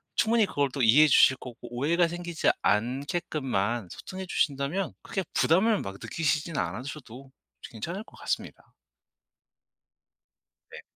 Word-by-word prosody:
충분히 225 0 +3
그걸 140 -5 0
또 140 - -2
이해해 135 +8 +7
주실 130 -1 +6
거고 125 -3 -10 0.2
오해가 165 +7 +2
생기지 175 -1 -1
않게끔만 120 - -1
소통해 190 0 -7
주신다면 150 +4 -1
크게 190 - -3
부담을 200 +6 +3
막 95 - -6
느끼시진 160 0 -1
않으셔도 125 - -5 0.3
괜찮을 170 - -6
것 - - -18
같습니다. - - -5 2.0
네. - - -10
145 Hz, 290 characters per minute, -27 LUFS, 125-175 Hz, 2.0 s, 이해해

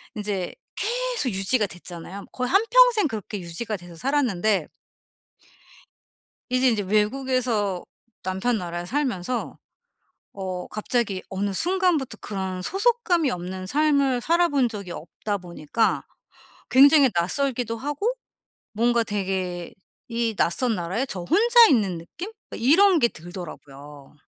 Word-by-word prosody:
인제 205 -4 -3 0.2
계속 485 - -1
유지가 205 +3 +1
됐잖아요. 180 +2 -9
거의 250 0 -2
한평생 455 0 +5
그렇게 210 -3 -5
유지가 180 +6 -4
돼서 175 -1 -13
살았는데 215 - +1 1.8
이제 255 0 +3
이제 215 -3 +1
외국에서 215 -1 0 0.4
남편 190 +6 0
나라에 175 -2 -5
살면서 245 -3 -2 0.8
어 185 -2 -5
갑자기 215 -3 -1
어느 195 0 -2
순간부터 345 - +1
그런 190 -2 -4
소속감이 390 - +1
없는 185 +1 -5
삶을 280 -2 +2
살아본 320 -4 +2
적이 200 -6 -7
없다 200 +6 -4
보니까 175 +3 -1 0.7
굉장히 280 +2 +7
낯설기도 230 +5 0
하고 295 - -1 0.6
뭔가 235 +2 +2
되게 190 -3 -3 0.3
이 230 -2 -1
낯선 225 +6 +1
나라에 185 +9 -2
저 190 -8 -5
혼자 470 - +6
있는 200 -9 +2
느낌? 350 - -8 0.2
이런 340 +8 +4
게 235 - +4
들더라고요. 150 -5 -10
220 Hz, 265 characters per minute, -24 LUFS, 185-280 Hz, 1.8 s, 굉장히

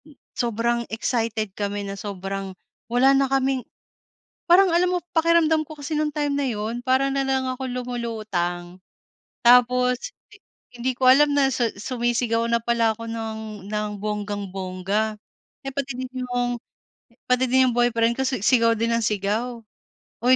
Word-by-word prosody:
Hmm, 305 -2 -18 0.2
sobrang 235 0 0
excited 225 -2 -2
kami 205 0 -3
na 195 - -5
sobrang 195 -1 -5 0.3
wala 255 +3 +4
na 275 -1 +2
kaming 270 -1 +1 0.9
parang 375 +2 +7
alam 360 +1 +3
mo - - -2
pakiramdam 325 -1 +3
ko 310 - -10
kasi 285 +2 -5
nung 305 0 0
time 290 -1 -1
na 285 - 0
yun 225 +2 -3
para 260 +1 +3
na 275 - +1
lang 265 -1 0
akong 255 0 -4
lumulutang, 215 -8 -3 0.7
tapos 250 - +4 0.2
i - - -15 0.4
hindi 245 +2 -1
ko 255 - +2
alam 290 +3 +6
na 285 -1 +4
sa 235 -1 +1
sumisigaw 235 +1 -1
na 235 - +3
pala 235 -1 +2
ako 230 +1 -8
ng 225 -1 -4 0.3
ng 210 0 -1
bonggang-bongga, 205 0 -2 0.5
eh, 270 - -3
pati 275 0 -3
din 255 0 -5 0.2
'yong, 245 -1 -1 0.7
pati 250 +1 +3
din 260 0 +4
'yong 235 - -3
boyfriend 235 -1 +2
ko - - +2
si 255 -3 -1
sigaw 230 -3 +4
din 230 +1 0
ng 230 0 +1
sigaw. 215 +4 -1 0.6
Uy 255 +1 +6
240 Hz, 155 wpm, -23 LUFS, 215-260 Hz, 0.9 s, parang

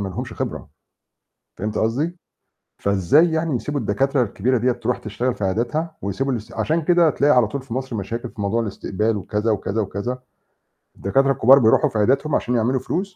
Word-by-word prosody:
ما 100 - -2
لهمش 90 - -6
خبرة، - - -5 0.9
فهمتِ 105 0 -3
قصدي؟ 145 +11 -1 0.7
فإزاي 100 - +3
يعني 160 -4 0
يسيبوا 145 +4 -3
الدكاترة 135 +5 +1
الكبيرة 120 +3 0
ديّة 125 +2 +2
ترُوح 120 +1 -2
تشتغل 120 +4 -2
في 105 - -4
عياداتها 125 - -1
ويسيبوا 130 +8 -2
الاس 110 -3 -5
عشان 160 +1 0
كده 170 0 +4
تلاقي 145 0 +3
على 125 -3 +5
طول 130 +5 -5
في 130 -4 -7
مصر 130 -2 -3
مشاكل 115 +4 -4
في 110 - -11
موضوع 100 +4 0
الاستقبال 105 +1 -2
وكذا، 105 +3 -1
وكذا، 105 0 -1
وكذا، 110 +5 -3 0.8
الدكاترة 135 +8 +1
الكبار 135 +2 +6
بيرُوحوا 110 -2 +4
في - - -4
عياداتهم 135 +8 +2
عشان 125 - 0
يعملوا 120 +3 +1
فلوس، 185 +8 -3
120 Hz, 180 wpm, -21 LUFS, 105-140 Hz, 0.9 s, الكبار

